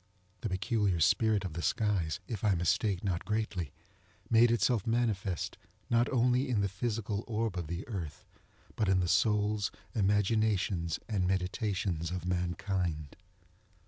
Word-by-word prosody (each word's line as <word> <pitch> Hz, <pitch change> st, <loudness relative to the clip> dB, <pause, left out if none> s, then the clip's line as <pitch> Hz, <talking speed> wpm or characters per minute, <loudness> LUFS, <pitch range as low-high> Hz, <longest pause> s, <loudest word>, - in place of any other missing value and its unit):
The 110 Hz, -, -3 dB
peculiar 95 Hz, -1 st, 0 dB
spirit 105 Hz, +5 st, +3 dB
of 90 Hz, -, -4 dB
the 85 Hz, -, -4 dB
skies, 95 Hz, -7 st, 0 dB
if 110 Hz, -3 st, -5 dB
I 105 Hz, -3 st, +3 dB
mistake 90 Hz, +3 st, +1 dB
not 90 Hz, -4 st, -1 dB
greatly, 105 Hz, -8 st, -2 dB, 0.6 s
made 115 Hz, +1 st, +6 dB
itself 115 Hz, -1 st, +2 dB
manifest, 110 Hz, -6 st, -1 dB, 0.3 s
not 120 Hz, +1 st, +3 dB
only 125 Hz, +1 st, +2 dB
in 110 Hz, -5 st, +2 dB
the 100 Hz, -, +2 dB
physical 105 Hz, +1 st, -2 dB
orb 110 Hz, -3 st, -1 dB
of 85 Hz, -4 st, -3 dB
the 85 Hz, +5 st, -5 dB
earth, 90 Hz, -, -6 dB, 0.5 s
but 105 Hz, -3 st, +1 dB
in 95 Hz, -1 st, +4 dB
the 90 Hz, -, +1 dB
souls, 105 Hz, +1 st, +2 dB, 0.2 s
imaginations, 100 Hz, -4 st, +1 dB
and 95 Hz, -5 st, 0 dB
meditations 95 Hz, -2 st, -1 dB
of 90 Hz, 0 st, -4 dB
mankind. 90 Hz, -4 st, -2 dB
100 Hz, 140 wpm, -31 LUFS, 90-110 Hz, 0.6 s, made